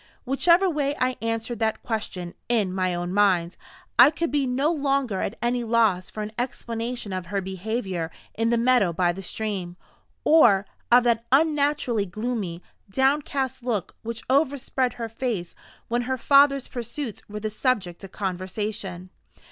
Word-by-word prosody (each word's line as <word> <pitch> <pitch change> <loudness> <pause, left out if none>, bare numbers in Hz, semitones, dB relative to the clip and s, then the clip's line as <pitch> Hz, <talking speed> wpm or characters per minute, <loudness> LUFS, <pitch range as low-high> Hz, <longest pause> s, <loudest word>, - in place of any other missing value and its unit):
Whichever 340 +8 +4
way 290 -4 0
I 255 0 +1
answered 230 0 -2
that 220 -1 -1
question 195 -6 -3 0.2
in 210 -6 +1
my 185 -1 0
own 175 +1 -3
mind, 185 -4 +3 0.4
I 245 +3 +10
could 325 +2 -2
be 285 -2 +1
no 270 +5 +1
longer 275 - 0
at 215 - -3
any 240 0 +1
loss 220 -6 +2
for 215 - -5
an 210 - -6
explanation 235 -3 -4
of 185 -2 -4
her 200 +2 -1
behavior 190 -2 -3 0.2
in 225 +1 0
the 235 - +2
meadow 235 -7 +3
by 175 0 +2
the 190 +3 -7
stream, 190 -3 -4 0.5
or 220 -11 +6 0.3
of 245 +1 +7
that 235 -1 +1
unnaturally 285 -7 +2
gloomy, 200 -3 -4 0.3
downcast 265 +2 0
look 230 -7 -2
which 230 0 -5
overspread 265 -2 +1
her 230 -1 -5
face 225 -6 -3 0.3
when 240 +1 0
her 260 - 0
father's 275 +1 +4
pursuits 240 -1 -5
were 210 +1 -5
the 215 0 -2
subject 205 -7 -1
of 195 - -9
conversation. 185 -1 -4
230 Hz, 155 wpm, -25 LUFS, 195-260 Hz, 0.5 s, I